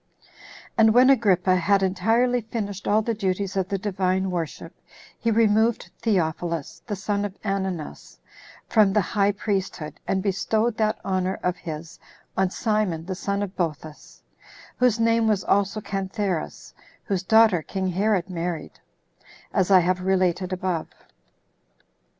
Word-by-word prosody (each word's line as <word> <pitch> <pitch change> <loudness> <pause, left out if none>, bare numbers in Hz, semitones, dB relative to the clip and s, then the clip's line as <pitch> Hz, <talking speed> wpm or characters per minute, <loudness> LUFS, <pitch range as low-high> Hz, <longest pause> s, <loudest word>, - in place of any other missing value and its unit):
2. - - -28 0.5
And 220 0 +6
when 255 +2 +7
Agrippa 190 -7 +3
had 195 +2 +2
entirely 225 +7 +2
finished 205 -3 -5
all 215 +1 +3
the 230 - -1
duties 195 -1 -2
of 190 -1 0
the 200 - 0
Divine 190 -1 -1
worship, 170 -4 -4 0.5
he 230 - 0
removed 225 +1 +2
Theophilus, 170 -6 -1
the 210 - -2
son 200 +1 -2
of 205 -1 -5
Ananus, 190 -6 -4 0.5
from 210 -4 +4
the 210 - +4
high 200 +1 +1
priesthood, 195 -6 -3
and 190 -1 0
bestowed 215 +3 0
that 215 0 +1
honor 185 -1 -1
of 180 0 0
his 160 -1 -8 0.4
on 190 -1 +2
Simon 200 -6 -1
the 190 - -3
son 200 +2 -2
of 195 -1 -6
Boethus, 155 -3 -5 0.5
whose 245 -3 +2
name 230 0 +3
was 205 -4 +1
also 200 +1 +1
Cantheras 195 -3 -3 0.3
whose 195 -5 -1
daughter 220 -3 +4
king 190 +4 -3
Herod 195 0 +1
married, 170 -3 -5 0.7
as 190 -3 +2
I 190 -2 +7
have 180 +1 0
related 185 -1 +1
above. 185 -3 -2
195 Hz, 140 wpm, -24 LUFS, 185-215 Hz, 0.7 s, when